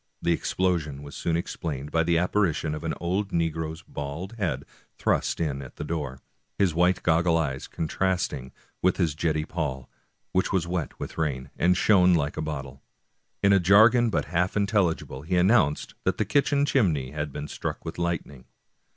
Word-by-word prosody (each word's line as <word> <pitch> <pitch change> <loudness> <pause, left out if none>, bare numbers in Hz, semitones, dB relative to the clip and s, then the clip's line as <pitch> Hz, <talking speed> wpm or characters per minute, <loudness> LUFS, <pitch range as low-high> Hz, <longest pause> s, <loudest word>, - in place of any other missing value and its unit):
The 85 - +1
explosion 80 -5 0
was 70 - -10
soon 85 -1 0
explained 75 -4 -4
by 80 - +3
the 85 0 +2
apparition 85 -3 +1
of 75 - -5
an 80 -1 -2
old 95 +4 -1
negro's 80 -2 -2
bald 70 +7 -6
head 95 -5 -1 0.3
thrust - - 0
in 75 -4 -1
at 65 - -10
the - - -5
door, 75 -4 -3 0.4
his 95 -5 +2
white 90 +3 +2
goggle 85 0 +3
eyes 70 -5 -2
contrasting 80 -5 -2 0.3
with 95 - +2
his 85 -5 +1
jetty 75 0 0
poll, 70 -7 -4 0.4
which 95 - +1
was 95 -3 +1
wet 85 -3 -3
with - - -6
rain, 70 -5 -2
and 90 +1 +3
shone 90 -3 +5
like 75 -2 0
a - - -3
bottle. 70 -3 -5 0.6
In 100 0 +6
a 100 - +6
jargon 110 +6 +6
but - - 0
half 90 +3 0
intelligible 100 -9 0
he 90 +5 -2
announced 90 -5 +3
that - - 0
the 105 - +1
kitchen 140 +5 +2
chimney 80 - +1
had 75 -1 -3
been 75 +2 -5
struck - - -5
with 80 +1 -6
lightning. 85 -7 -3
85 Hz, 175 wpm, -26 LUFS, 75-95 Hz, 0.6 s, In